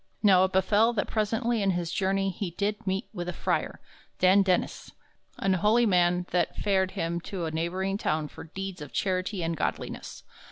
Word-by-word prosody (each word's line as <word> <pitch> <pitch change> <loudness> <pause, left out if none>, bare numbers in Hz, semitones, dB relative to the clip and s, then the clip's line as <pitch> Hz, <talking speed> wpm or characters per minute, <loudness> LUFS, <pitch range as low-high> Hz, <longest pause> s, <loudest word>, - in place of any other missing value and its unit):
Now 190 -3 +6
it 190 - -3
befell 205 +5 +3
that 210 - 0
presently 225 +2 0
in 195 - +2
his 170 -2 -3
journey 195 0 +1
he 185 +1 -4
did 205 +4 -3
meet 190 +4 -1
with 175 -3 -4
a - - -3
frere, - - -1 0.4
Dan 185 +2 +5
Dennyss, 185 -2 -1 0.4
an 195 -1 +1
holy 210 +6 +3
man 180 -3 +3
that 175 -2 +1
fared 190 -2 +1
him 170 +1 -1
to 180 -1 -4
a 160 - -3
neighboring 185 +5 -2
town 155 -4 0
for - - -11
deeds 190 +1 -6
of 150 - -9
charity 185 0 -1
and 165 0 -1
godliness. - - -4
190 Hz, 185 wpm, -28 LUFS, 175-200 Hz, 0.4 s, Now